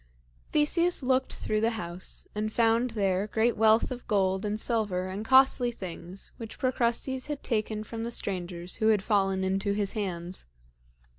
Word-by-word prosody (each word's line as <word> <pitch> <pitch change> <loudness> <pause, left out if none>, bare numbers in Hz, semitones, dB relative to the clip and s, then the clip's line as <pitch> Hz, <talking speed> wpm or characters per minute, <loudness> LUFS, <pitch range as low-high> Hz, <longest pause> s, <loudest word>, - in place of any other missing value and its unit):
Theseus 335 +2 +3
looked 260 0 +1
through 215 0 -1
the 225 - +3
house 175 -1 -3
and 215 +1 -2
found 230 +2 +2
there 195 0 +1
great 225 +2 +1
wealth 220 +3 +4
of 245 -1 -7
gold 190 -2 +1
and 210 0 -2
silver 210 -6 0
and 190 +3 -5
costly 260 0 +5
things 185 -3 -6
which 225 -2 -8
Procrustes 255 +1 0
had 295 -2 -5
taken 215 -2 -1
from 225 +1 -6
the 235 - -3
strangers 180 -5 -2
who 220 - +1
had 210 -3 +3
fallen 195 -2 +1
into 195 +2 0
his 200 -1 -1
hands. 180 - -4
215 Hz, 160 wpm, -28 LUFS, 190-235 Hz, -, costly